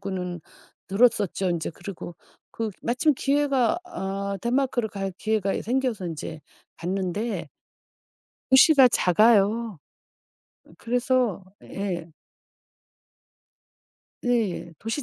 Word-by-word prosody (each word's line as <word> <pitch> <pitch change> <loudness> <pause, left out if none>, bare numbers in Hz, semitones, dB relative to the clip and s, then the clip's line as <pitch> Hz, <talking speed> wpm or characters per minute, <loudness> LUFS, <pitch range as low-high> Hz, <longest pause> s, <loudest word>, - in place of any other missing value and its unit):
거는 180 -3 -4 0.5
들었었죠. 195 -3 +2
인제 170 -2 -2
그리고 175 0 -8 0.4
그 225 -2 -3
마침 270 +5 +2
기회가 280 +1 +1
어 200 - -4
덴마크를 245 -1 0
갈 195 -2 -4
기회가 215 -3 0
이제 - - -3
생겨서 240 -5 -1
인제 160 -1 -6 0.4
갔는데 190 +5 -3 1.0
도시가 265 0 +7
작아요. 215 0 +3 0.9
어 - - -18
그래서 245 -4 0 0.2
예. 175 -4 -4 2.1
예. 215 -8 0
도시 225 +7 -3
215 Hz, 200 characters per minute, -25 LUFS, 190-245 Hz, 2.1 s, 도시가